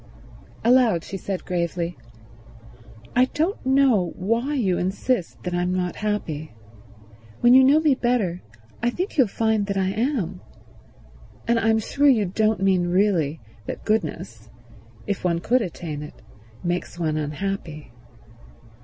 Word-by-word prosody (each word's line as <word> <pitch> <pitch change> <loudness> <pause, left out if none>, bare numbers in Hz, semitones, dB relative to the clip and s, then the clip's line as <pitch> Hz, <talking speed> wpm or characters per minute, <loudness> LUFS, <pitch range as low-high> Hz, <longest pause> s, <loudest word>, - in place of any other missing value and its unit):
Aloud 235 -7 +4
she 195 - -7
said 190 0 -4
gravely, 170 -1 -2 1.2
"I 250 +1 +5
don't 325 +9 -2
know 260 -10 +3
why 230 +9 -1
you 195 -9 +1
insist 190 +2 -2
that 180 - -3
I'm 175 +1 0
not 180 -1 -2
happy. 160 - -3 0.9
When 240 +1 +6
you 260 +1 +8
know 280 +4 +6
me 310 -3 +3
better 240 -9 0 0.4
I 240 - +2
think 360 - -4
you'll 265 -6 +4
find 220 0 0
that 200 -1 -2
I 190 -1 +1
am. 205 - -2 1.1
And 235 0 +3
I'm 225 0 +3
sure 280 +6 +1
you 225 -6 +4
don't 215 +1 0
mean 185 -2 +2
really 175 -5 +1 0.3
that - - -6
goodness, 115 - -2 0.6
if 200 - -3
one 170 -2 +1
could 245 +9 +1
attain 165 -6 -5
it, 150 - -10 0.4
makes 175 0 -3
one 160 -3 -1
unhappy." 155 0 -4
195 Hz, 135 wpm, -23 LUFS, 175-240 Hz, 1.2 s, you